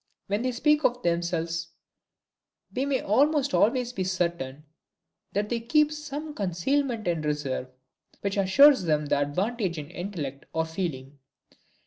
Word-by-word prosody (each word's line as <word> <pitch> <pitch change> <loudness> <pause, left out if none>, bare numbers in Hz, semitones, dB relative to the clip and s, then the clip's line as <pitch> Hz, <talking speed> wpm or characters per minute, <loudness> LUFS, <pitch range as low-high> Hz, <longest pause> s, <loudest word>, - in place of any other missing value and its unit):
When 205 +2 -1
they 255 +1 0
speak 300 +5 +2
of 245 -1 +1
themselves, 170 -1 -1 1.1
we 265 +2 -1
may 270 -2 +1
almost 285 +5 +2
always 245 +2 +2
be 190 - -2
certain 170 -7 -2 0.7
that 205 +1 -1
they 235 - 0
keep 300 +6 +3
some 300 0 -6
concealment 220 - -1
in 170 -2 0
reserve, 145 -4 -2 0.5
which 200 -1 -1
assures 235 +5 +6
them 150 -2 +1
the 145 - +1
advantage 185 - -1
in 145 -1 -7
intellect, 160 -8 -5
or 160 0 +1
feeling. 145 -5 -5
195 Hz, 135 wpm, -27 LUFS, 160-255 Hz, 1.1 s, assures